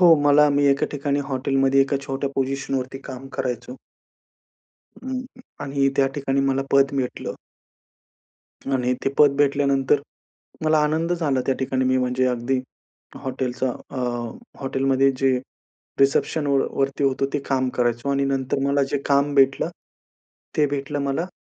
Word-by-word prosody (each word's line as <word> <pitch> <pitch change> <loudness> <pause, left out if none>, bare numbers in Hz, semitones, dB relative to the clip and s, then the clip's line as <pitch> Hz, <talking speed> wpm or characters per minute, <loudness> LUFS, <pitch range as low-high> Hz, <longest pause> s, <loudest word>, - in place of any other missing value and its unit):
हो, 180 - +7 0.2
मला 145 +1 +6
मी 145 - +3
एका 140 - 0
ठिकाणी 145 0 -1
हॉटेलमध्ये 135 +1 +2
एका 140 +1 +2
छोट्या 135 0 -2
पोझिशनवरती 135 -1 -2
काम 130 0 -8
करायचो. 125 0 -3 1.3
हं 260 0 -3 0.5
आणि 140 0 +1
त्या 135 - +4
ठिकाणी 140 -1 0
मला 135 0 +1
पद 140 +1 +4
भेटलं. 130 -2 -3 1.4
आणि 125 -1 +1
ते - - +3
पद 145 -2 +6
भेटल्यानंतर 140 -1 +2 0.6
मला 155 0 +4
आनंद 160 +3 +1
झाला 150 -7 0
त्या 135 - +2
ठिकाणी. 130 0 0
मी 130 0 +2
म्हणजे 125 0 +1
अगदी 125 +1 0 0.6
हॉटेलचा 130 -1 -2 0.2
अ, - - -8 0.6
हॉटेलमध्ये 135 0 +2
जे 135 -1 +3 0.6
रिसेप्शनवर 140 0 +2
वरती 135 +1 -1
होतो 135 0 +1
ते - - +1
काम 130 -1 +1
करायचो 120 +1 0
आणि 140 0 +1
नंतर 135 -1 -1
मला 140 0 +2
जे 145 - 0
काम 140 0 +2
भेटलं, 135 -1 +3 0.9
ते 150 - +4
भेटलं 145 +1 -3
मला 140 +5 -1
135 Hz, 135 wpm, -23 LUFS, 130-140 Hz, 1.4 s, हो